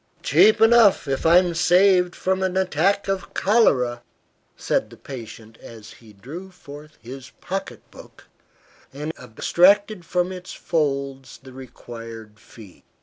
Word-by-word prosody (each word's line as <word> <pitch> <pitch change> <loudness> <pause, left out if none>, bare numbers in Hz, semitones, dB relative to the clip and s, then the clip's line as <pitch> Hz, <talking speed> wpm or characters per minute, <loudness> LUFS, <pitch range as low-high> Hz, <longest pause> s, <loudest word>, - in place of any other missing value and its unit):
"Cheap 215 - +4
enough, 225 -7 +4
if 135 +3 -1
I 170 +2 +6
am 180 -1 +2
saved 180 +1 +3
from 190 0 -2
an 190 0 -1
attack 190 +2 0
of 195 -1 -4
cholera," 130 - +2 0.6
said - - -1
the - - -15
patient 115 -4 -11
as 110 -3 -13
he 115 -2 -17
drew 145 - -10
forth 150 -4 -14
his 130 +2 -10
pocket 195 +1 -6
book - - -16 0.7
and 150 +4 -6
abstracted 185 - +2
from 180 +2 -2
its 185 -1 -9
folds 140 -5 -3
the 130 -1 -13
required 115 -4 -11
fee. 105 -4 -16
155 Hz, 135 wpm, -22 LUFS, 125-185 Hz, 0.7 s, I